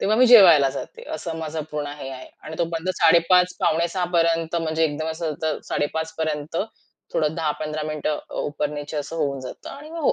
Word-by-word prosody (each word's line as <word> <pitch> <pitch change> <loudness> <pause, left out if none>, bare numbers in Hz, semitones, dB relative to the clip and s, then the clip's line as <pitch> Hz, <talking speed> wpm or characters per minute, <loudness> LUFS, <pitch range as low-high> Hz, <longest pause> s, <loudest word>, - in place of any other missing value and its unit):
तेव्हा 215 +2 +2
मी 255 +2 +6
जेवायला 175 - +8
जाते. 140 - -7
असं 165 +1 -5
माझं 160 -1 -4
पूर्ण 150 -1 -3
हे 135 - -6
आहे. 130 -1 -9
आणि 160 - -8
तो 170 - +2
बंद 165 +3 -3
05:30-05:45 170 -1 +3
म्हणजे 160 -1 +1
एकदम 155 +1 -2
असं 160 -1 -3
तर 155 -1 0
05:30 160 +2 -2
पर्यंत 155 0 -2 0.6
थोडं 155 0 +1
10-15 155 -1 -2
मिनिटं 155 0 -2
अ, - - -8
उपर 145 0 -2
नीचे 145 +1 -6
असं 150 +3 -4
होऊन 140 -4 -1
जातं 130 - -9
आणि 295 +3 -10
मग 335 - -6
हो, - - +4
160 Hz, 185 wpm, -23 LUFS, 150-170 Hz, 0.6 s, जेवायला